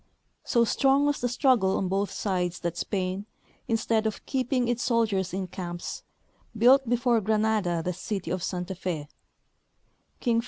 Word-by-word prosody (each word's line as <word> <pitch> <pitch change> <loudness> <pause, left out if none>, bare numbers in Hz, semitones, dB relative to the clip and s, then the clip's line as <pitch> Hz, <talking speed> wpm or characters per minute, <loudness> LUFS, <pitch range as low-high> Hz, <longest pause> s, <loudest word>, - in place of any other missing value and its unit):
So 235 -1 +3
strong 275 +4 +3
was 290 0 0
the 245 - +1
struggle 245 -6 +3
on 190 - -1
both 195 +2 0
sides 180 -3 -2
that 170 -1 -2
Spain, 190 +2 -2 0.4
instead 225 -1 +1
of 215 - -5
keeping 255 -2 0
its 240 0 0
soldiers 215 -6 +1
in 190 +1 -2
camps, 175 -1 -6 0.6
built 255 +3 +5
before 240 -1 +2
Granada 210 -5 +1
the 180 - 0
city 190 -2 -4
of 185 0 -1
Santa 180 +1 -3
Fe. 170 -5 -4
210 Hz, 145 wpm, -27 LUFS, 185-240 Hz, 0.6 s, built